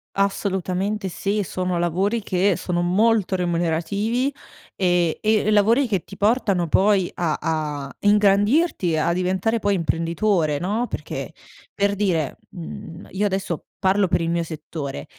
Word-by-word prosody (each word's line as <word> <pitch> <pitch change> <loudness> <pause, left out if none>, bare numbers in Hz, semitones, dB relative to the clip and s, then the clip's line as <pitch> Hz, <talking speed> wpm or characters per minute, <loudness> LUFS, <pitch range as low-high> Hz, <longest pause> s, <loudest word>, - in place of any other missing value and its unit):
Assolutamente 195 0 -1
sì, 200 +3 -1
sono 185 -1 -2
lavori 190 +6 0
che 190 0 +2
sono 175 -1 -1
molto 200 +2 +2
remunerativi, 180 - 0 0.4
e 175 -3 +1
e 215 -1 +2
lavori 225 +6 +4
che 195 -5 0
ti 195 - -12
portano 205 -5 +2
poi 190 +2 +3
a 165 -3 -1
a 150 -3 -3
ingrandirti, 205 - +3
a 170 +2 +1
diventare 190 +5 0
poi 205 -1 +1
imprenditore, 165 -1 0
no, 210 +9 -1
perché - - -5 0.4
per 200 0 +1
dire, 180 -8 0
mhmm, 165 0 -9
io 200 +2 0
adesso 190 -4 -3
parlo 190 0 +2
per 175 -1 +1
il 165 - -1
mio 170 0 +1
settore, 155 - -6
190 Hz, 135 wpm, -22 LUFS, 170-205 Hz, 0.4 s, lavori